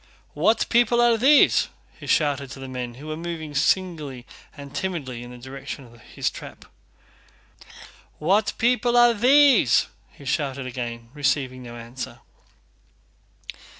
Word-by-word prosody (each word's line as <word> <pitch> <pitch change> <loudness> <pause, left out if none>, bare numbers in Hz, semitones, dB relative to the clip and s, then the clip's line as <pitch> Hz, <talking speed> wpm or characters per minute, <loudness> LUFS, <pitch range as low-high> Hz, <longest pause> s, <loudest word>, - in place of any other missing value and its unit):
"What 225 +1 +2
people 240 0 +3
are 240 -1 +5
these?" 275 +6 +5 0.3
he - - -10
shouted 145 -4 +1
to 135 - -10
the 135 - -7
men, 125 -2 -6
who 140 +4 -12
were 155 0 -4
moving 165 -2 -6
singly 150 -5 -1 0.3
and 140 -1 -10
timidly 145 -11 -4
in 120 - -9
the 125 - -11
direction 130 +2 -8
of 120 -1 -18
his - - -3
trap. - - -11 1.5
"What 195 +7 +1
people 245 0 +2
are 240 0 +6
these?" 250 - +5 0.2
he 140 - -15
shouted 135 -1 -2
again, 120 -2 -6
receiving 135 -3 -1
no 120 -1 -9
answer. 120 +2 -8
145 Hz, 135 wpm, -24 LUFS, 130-210 Hz, 1.5 s, are